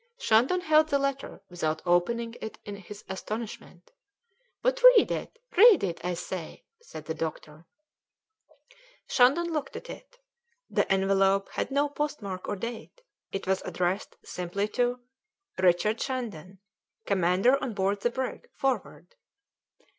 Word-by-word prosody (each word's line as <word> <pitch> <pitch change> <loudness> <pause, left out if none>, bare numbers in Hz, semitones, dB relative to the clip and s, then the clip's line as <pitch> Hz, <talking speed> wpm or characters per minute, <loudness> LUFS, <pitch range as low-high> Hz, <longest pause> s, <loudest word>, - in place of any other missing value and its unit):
Shandon 270 - +3
held 310 -2 +4
the 280 - +3
letter 275 0 -3
without 160 -3 -3
opening 230 +7 +1
it 220 - -6
in 205 - -6
his 205 +1 -11
astonishment. 195 -2 -7 0.7
"But - - +1
read 445 - +4
it, - - -4 0.2
read 405 - +8
it, 175 -4 -3
I 180 0 -1
say," 170 -1 -6 0.2
said 155 - -10
the 160 - -3
doctor. 160 0 -6 1.4
Shandon 295 +7 +3
looked 300 -2 -3
at - - -7
it. - - -13 0.5
The - - +1
envelope 195 0 +2
had - - -3
no 285 +2 +2
postmark 280 -11 -4
or - - -1
date; 230 - -7 0.3
it 195 - -4
was 190 0 +1
addressed 180 +3 -2
simply 180 +3 -3
to: 245 +1 0 0.6
"RICHARD 185 +4 +2
SHANDON, 210 - -4 0.5
"Commander 195 +7 +3
on 250 -5 -3
board 200 +1 0
the 240 - +2
brig 260 +1 -5
"Forward." 270 - -2
210 Hz, 130 wpm, -28 LUFS, 185-270 Hz, 1.4 s, read